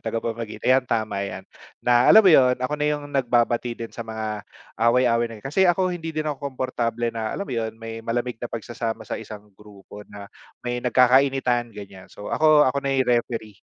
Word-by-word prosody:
tagapamagitan 115 Hz, 0 st, -5 dB
ayan 130 Hz, 0 st, +4 dB
tama 110 Hz, -3 st, -1 dB
yan 100 Hz, -, -5 dB, 0.4 s
na 120 Hz, 0 st, +4 dB
alam 220 Hz, -1 st, +8 dB
mo 185 Hz, -, +7 dB
'yun 125 Hz, -3 st, +5 dB
ako 130 Hz, +3 st, -3 dB
na 150 Hz, 0 st, -1 dB
yung 145 Hz, -1 st, -2 dB
nagbabati 120 Hz, -2 st, +1 dB
din 115 Hz, -1 st, -7 dB
sa -, -, -9 dB
mga, 110 Hz, -2 st, -5 dB, 0.4 s
away-away 120 Hz, 0 st, +3 dB
na 115 Hz, -, -9 dB
yan, 105 Hz, -, -17 dB
kasi 180 Hz, +7 st, +2 dB
ako 185 Hz, +1 st, +2 dB
hindi 165 Hz, -2 st, -6 dB
din 155 Hz, -1 st, -3 dB
ako 150 Hz, -3 st, -4 dB
komportable 120 Hz, -3 st, -2 dB
na 110 Hz, -1 st, -3 dB
alam 200 Hz, -, -3 dB
mo 130 Hz, -, -7 dB
'yun 110 Hz, -1 st, -3 dB
may 115 Hz, 0 st, -8 dB
malamig 120 Hz, +1 st, -3 dB
na 120 Hz, -, -4 dB
pagsasama 115 Hz, -1 st, -5 dB
sa 110 Hz, -, -5 dB
isang 105 Hz, -2 st, -11 dB
grupo 105 Hz, 0 st, -14 dB
na 100 Hz, 0 st, -10 dB, 0.4 s
may 120 Hz, 0 st, -2 dB
nagkakainitan 125 Hz, -1 st, +3 dB
ganiyan. 100 Hz, -3 st, -12 dB
So 105 Hz, -, -9 dB
ako, 155 Hz, -1 st, +5 dB
ako 140 Hz, +2 st, 0 dB
na 140 Hz, 0 st, -1 dB
yung 130 Hz, -, +2 dB, 0.2 s
referee. 110 Hz, -5 st, -8 dB
120 Hz, 195 wpm, -23 LUFS, 110-135 Hz, 0.4 s, alam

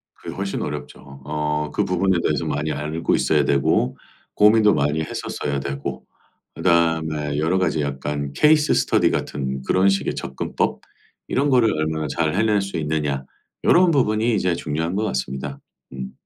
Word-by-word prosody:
그게 -, -, -8 dB
훨씬 100 Hz, 0 st, -3 dB
어렵죠. 70 Hz, 0 st, -7 dB
어 75 Hz, 0 st, -2 dB
그 -, -, +1 dB
부분에 90 Hz, +1 st, +1 dB
대해서 75 Hz, -3 st, 0 dB
많이 75 Hz, +2 st, -2 dB
알고 75 Hz, +3 st, -1 dB
있어야 -, -, +2 dB
되고 70 Hz, -2 st, +1 dB, 0.4 s
고민도 105 Hz, 0 st, +5 dB
많이 75 Hz, +2 st, +1 dB
했었어야 70 Hz, -2 st, -3 dB
되고 70 Hz, 0 st, -5 dB, 0.5 s
그다음에 80 Hz, -4 st, +1 dB
여러 80 Hz, +5 st, +1 dB
가지 85 Hz, -4 st, 0 dB
약간 70 Hz, 0 st, -3 dB
케이스 150 Hz, -, +4 dB
스터디 -, -, +3 dB
같은 65 Hz, -2 st, -3 dB
그런 95 Hz, +6 st, +3 dB
식의 95 Hz, 0 st, 0 dB
접근법? -, -, -2 dB, 0.5 s
이런 140 Hz, +2 st, +1 dB
거를 120 Hz, -5 st, +4 dB
얼마나 80 Hz, 0 st, -2 dB
잘 80 Hz, +2 st, 0 dB
해낼 105 Hz, 0 st, +2 dB
수 100 Hz, -1 st, -5 dB
있느냐 75 Hz, -3 st, -1 dB, 0.4 s
요런 180 Hz, -1 st, +5 dB
부분이 115 Hz, -5 st, +2 dB
이제 90 Hz, -3 st, +1 dB
중요한 80 Hz, +2 st, -2 dB
것 105 Hz, -, 0 dB
같습니다. 65 Hz, -1 st, -4 dB, 0.3 s
음. 65 Hz, -1 st, -6 dB
80 Hz, 330 characters per minute, -22 LUFS, 70-95 Hz, 0.5 s, 고민도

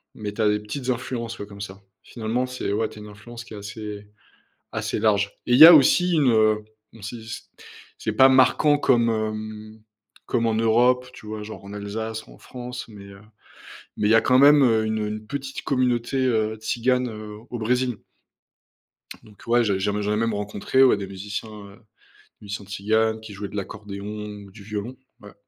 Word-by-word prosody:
mais, 105 Hz, -1 st, -5 dB
tu 110 Hz, -, -3 dB
as 105 Hz, -, +3 dB
des 105 Hz, 0 st, +1 dB
petites 125 Hz, +5 st, -6 dB
influences, 120 Hz, -2 st, -3 dB
ouais, 100 Hz, -, -5 dB
comme 100 Hz, -1 st, -11 dB
ça. 100 Hz, -1 st, -8 dB, 0.2 s
Finalement, 115 Hz, +2 st, -2 dB
c'est 125 Hz, -5 st, -4 dB
ouais, 110 Hz, +2 st, 0 dB
tu 105 Hz, -, -12 dB
as -, -, -10 dB
une 105 Hz, -, -10 dB
influence 115 Hz, +3 st, -11 dB
qui 115 Hz, -, -13 dB
est -, -, -7 dB
assez 105 Hz, 0 st, -8 dB, 0.7 s
assez -, -, -2 dB
large 105 Hz, -2 st, +2 dB, 0.2 s
et -, -, 0 dB
il 125 Hz, -, +5 dB
y 160 Hz, -, +13 dB
a 175 Hz, -, +11 dB
aussi 175 Hz, +5 st, +5 dB
une, 140 Hz, -7 st, +3 dB
heu, 110 Hz, -1 st, +3 dB, 0.3 s
mmh, 115 Hz, -, -15 dB
si 110 Hz, +2 st, -7 dB
c 110 Hz, -, -6 dB, 0.5 s
c'est -, -, -3 dB
pas 135 Hz, 0 st, +6 dB
marquant 130 Hz, +3 st, +4 dB
comme, 120 Hz, -5 st, +3 dB
hem, 110 Hz, 0 st, -4 dB, 0.4 s
comme 115 Hz, -1 st, 0 dB
en 110 Hz, -, +1 dB
Europe, 120 Hz, +3 st, +3 dB
tu 110 Hz, -, -13 dB
vois, 105 Hz, 0 st, -6 dB
genre, 110 Hz, -2 st, -10 dB
en 100 Hz, -, -10 dB
Alsace 110 Hz, +2 st, -5 dB
ou -, -, -16 dB
en -, -, -18 dB
France, 125 Hz, -1 st, -8 dB
mais, 105 Hz, -3 st, -12 dB
heu, 100 Hz, 0 st, -13 dB, 0.8 s
mais 105 Hz, -, +1 dB
il -, -, +4 dB
y -, -, +7 dB
a 115 Hz, -, +6 dB
quand 125 Hz, 0 st, +3 dB
même, 145 Hz, +1 st, +7 dB
heu, 110 Hz, -3 st, +3 dB
une, 110 Hz, 0 st, -1 dB
heu, 105 Hz, -, -2 dB
une 105 Hz, 0 st, -6 dB
petite 135 Hz, +1 st, -5 dB
communauté, 125 Hz, -1 st, 0 dB
heu, 110 Hz, -3 st, +1 dB
Tzigane, 125 Hz, +3 st, 0 dB
heu, 105 Hz, -1 st, -8 dB
au 120 Hz, -, -5 dB
Brésil. 125 Hz, +1 st, 0 dB, 1.3 s
Donc, 105 Hz, -2 st, -18 dB
ouais, 120 Hz, +1 st, +3 dB
j'ai 100 Hz, -3 st, 0 dB
j'ai 105 Hz, +2 st, 0 dB
m 105 Hz, +1 st, -2 dB
j'en 105 Hz, 0 st, -1 dB
ai -, -, 0 dB
même 115 Hz, 0 st, 0 dB
rencontré, 105 Hz, +6 st, 0 dB
ouais, 130 Hz, -, +6 dB
des 100 Hz, -1 st, -5 dB
musiciens, 100 Hz, +3 st, -6 dB
heu, 100 Hz, -2 st, -12 dB
des 110 Hz, -2 st, -29 dB, 0.4 s
musiciens 100 Hz, 0 st, -6 dB
tziganes 110 Hz, +2 st, 0 dB
qui 110 Hz, -2 st, -10 dB
jouaient 100 Hz, 0 st, -6 dB
de -, -, -11 dB
l'accordéon 100 Hz, 0 st, -7 dB, 0.4 s
ou 100 Hz, -, -15 dB
du 100 Hz, +1 st, -13 dB
violon. 105 Hz, +4 st, -5 dB, 0.2 s
Ouais. 105 Hz, 0 st, -13 dB
110 Hz, 210 wpm, -24 LUFS, 105-120 Hz, 1.3 s, y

